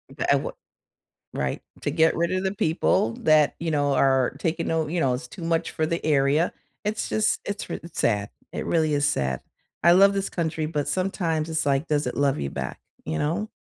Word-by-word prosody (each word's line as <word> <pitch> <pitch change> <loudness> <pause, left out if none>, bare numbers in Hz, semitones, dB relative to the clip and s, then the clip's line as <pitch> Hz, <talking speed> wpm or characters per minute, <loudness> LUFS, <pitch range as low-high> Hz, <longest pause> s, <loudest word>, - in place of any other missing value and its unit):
B - - -3
a - - +7
w - - -3 0.8
Right, - - -2 0.2
to - - -1
get 160 0 +3
rid 170 +1 0
of 185 0 0
the 190 +2 -1
people 160 - +2
that, 155 -2 +4
you 165 - -2
know, 145 -1 +2
are 135 -2 +3
taking 165 0 -1
note 160 -2 0
you 175 - 0
know, 130 -4 +2
it's 125 0 -5
too 175 - -11
much 165 0 0
for 155 - -1
the 170 +2 -2
area. 150 +2 +2 0.3
It's 215 +1 -2
just 215 - +1
it's 205 0 -4
r - - -3
it's 170 - -8
sad, 105 -3 +1 0.2
it - - -3
really 160 -2 +1
is 145 0 +2
sad. 65 - -1 0.4
I 170 - +7
love 195 +2 +6
this 195 0 -1
country, 160 -2 -2
but 150 -2 -2
sometimes 170 -4 -1
it's, 160 -1 -1
like, 140 +3 +1
does 150 -3 +1
it 125 - -3
love 140 - +2
you 70 -1 -2
back? - - -5 0.3
You 80 - -2
know? 170 +9 -1
160 Hz, 215 wpm, -25 LUFS, 140-170 Hz, 0.8 s, a